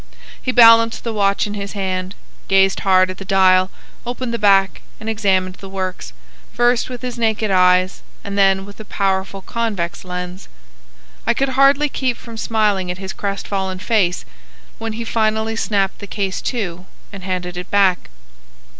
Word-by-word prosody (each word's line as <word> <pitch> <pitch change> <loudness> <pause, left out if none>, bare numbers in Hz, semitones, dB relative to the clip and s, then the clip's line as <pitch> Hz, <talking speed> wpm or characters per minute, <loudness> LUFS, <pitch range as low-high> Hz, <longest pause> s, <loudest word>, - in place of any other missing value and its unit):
He 255 - -1
balanced 230 -1 +6
the 230 - -3
watch 200 -2 +1
in 205 - -5
his 200 -1 -5
hand, 185 -1 -3 0.3
gazed 195 0 +3
hard 185 -1 +3
at 185 - -11
the - - -6
dial, 185 -1 +4 0.3
opened 245 0 -4
the 235 - -2
back, 195 -2 +3 0.2
and 220 - -8
examined 190 -4 0
the 195 - -10
works, 185 - -4 0.4
first 240 0 +2
with 250 -1 -8
his 250 -1 -5
naked 220 -2 0
eyes 185 0 +3 0.2
and 200 0 -5
then 195 -1 +3
with 200 +1 -13
a - - -7
powerful 195 -1 -2
convex 210 -8 -3
lens. 180 0 -7 0.8
I - - +3
could 275 0 0
hardly 275 +3 +4
keep 260 -3 -2
from 230 -1 -11
smiling 210 -5 0
at 180 - -3
his 190 +1 -6
crestfallen 195 -2 -3
face 185 -3 0 0.5
when 225 -1 -4
he 230 +2 -4
finally 220 0 0
snapped 200 -3 0
the 205 - -8
case 195 -2 -3
to 185 -7 -4 0.3
and 195 -2 -9
handed 180 -1 -3
it 180 +1 -7
back. 195 - +2
200 Hz, 165 wpm, -19 LUFS, 185-225 Hz, 0.8 s, balanced